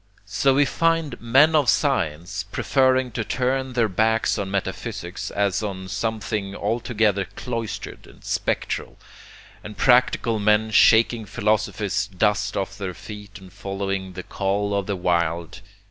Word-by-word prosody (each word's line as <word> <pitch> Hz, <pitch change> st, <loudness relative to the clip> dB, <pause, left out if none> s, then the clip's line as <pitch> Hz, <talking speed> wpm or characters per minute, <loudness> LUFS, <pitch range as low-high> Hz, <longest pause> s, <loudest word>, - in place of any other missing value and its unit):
So 135 Hz, -1 st, +2 dB
we 145 Hz, +1 st, +4 dB
find 165 Hz, -4 st, 0 dB
men 135 Hz, +7 st, +5 dB
of 145 Hz, -5 st, +4 dB
science 95 Hz, -, 0 dB
preferring 130 Hz, -2 st, +2 dB
to 115 Hz, 0 st, -2 dB
turn 130 Hz, +3 st, -1 dB
their 120 Hz, -2 st, +2 dB
backs 110 Hz, +3 st, +1 dB
on 100 Hz, -1 st, -3 dB
metaphysics 100 Hz, 0 st, -4 dB
as 100 Hz, -1 st, 0 dB
on 95 Hz, -3 st, -5 dB
something 105 Hz, -1 st, -3 dB
altogether 105 Hz, -2 st, 0 dB
cloistered 115 Hz, -3 st, -5 dB
and -, -, -18 dB
spectral, -, -, -2 dB, 0.7 s
and 105 Hz, -, -9 dB
practical 125 Hz, -3 st, +3 dB
men 105 Hz, +1 st, +2 dB
shaking 110 Hz, 0 st, +4 dB
philosophy's 105 Hz, -3 st, 0 dB
dust 105 Hz, +2 st, 0 dB
off 95 Hz, +1 st, -3 dB
their 95 Hz, -3 st, -4 dB
feet 105 Hz, -2 st, -10 dB
and 95 Hz, -1 st, -15 dB
following 95 Hz, -1 st, -4 dB
the 90 Hz, 0 st, -7 dB
call 100 Hz, +2 st, -1 dB
of 100 Hz, -1 st, -1 dB
the 100 Hz, -, -1 dB
wild. 85 Hz, 0 st, -1 dB
105 Hz, 135 wpm, -23 LUFS, 95-120 Hz, 0.7 s, men